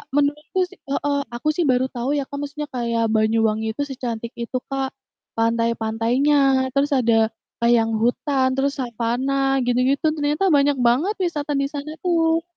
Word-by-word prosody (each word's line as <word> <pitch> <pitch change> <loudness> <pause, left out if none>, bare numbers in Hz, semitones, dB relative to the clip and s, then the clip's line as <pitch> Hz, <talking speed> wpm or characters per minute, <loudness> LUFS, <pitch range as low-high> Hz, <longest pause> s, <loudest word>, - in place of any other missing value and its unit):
menurutku 295 +4 0
sih 390 - -17
heeh, 285 0 0 0.2
aku 240 - -4
sih 350 - +1
baru 255 +1 +2
tahu 240 +2 -2
ya, - - -1
Kak, 285 - -8
maksudnya 290 +1 -5
kayak 235 -1 0
Banyuwangi 220 0 +2
itu 225 - -5
secantik 235 -3 -5
itu, 245 +2 -3
Kak, 270 -1 -1 0.5
pantai-pantainya, 230 +4 +1 0.4
terus 280 +2 +2
ada, 225 -2 +3 0.3
eee, 235 - +4
yang 225 0 0
hutan, 260 +3 +1
terus 275 +1 0
savana 260 +3 0
gitu-gitu, 255 +4 +1
ternyata 295 +4 0
banyak 285 0 +4
banget 305 - +2
wisata 300 -4 -2
di 275 - 0
sana 290 +1 -5
tuh. 330 -2 +2
270 Hz, 155 wpm, -22 LUFS, 235-290 Hz, 0.5 s, eee